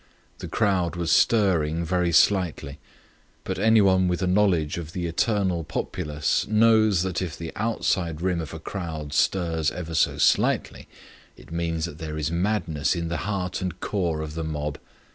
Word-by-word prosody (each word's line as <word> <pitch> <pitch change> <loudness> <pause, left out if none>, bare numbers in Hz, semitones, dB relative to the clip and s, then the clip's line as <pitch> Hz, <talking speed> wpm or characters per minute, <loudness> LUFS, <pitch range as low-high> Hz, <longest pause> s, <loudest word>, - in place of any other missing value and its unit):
The - - -6
crowd 95 -6 0
was 85 -1 -1
stirring 85 -6 +2
very 90 0 0
slightly. 85 -7 +2 0.6
But - - -4
anyone 100 -4 +4
with 90 +1 -1
a - - +2
knowledge 90 -5 +2
of 80 -1 -8
the 90 -2 -3
eternal 90 0 0
populace 75 -1 -2
knows 110 -3 +4
that 95 -1 -2
if 85 -6 -4
the 85 -1 -6
outside 95 -7 -1
rim 90 -1 0
of 75 -3 -7
a 80 - -7
crowd 80 -5 -6
stirs 80 -2 +1
ever 85 -1 -6
so - - +2
slightly - - +1 0.5
it - - -16
means 85 -1 -2
that 80 -3 -8
there 80 -1 -5
is 75 +1 -2
madness 85 -4 0
in 85 -1 -3
the 85 - -2
heart 95 -3 -2
and 90 -1 -4
core 85 -6 -1
of 75 -1 -6
the 80 +1 -4
mob. 75 -2 -4
85 Hz, 165 wpm, -25 LUFS, 80-95 Hz, 0.6 s, anyone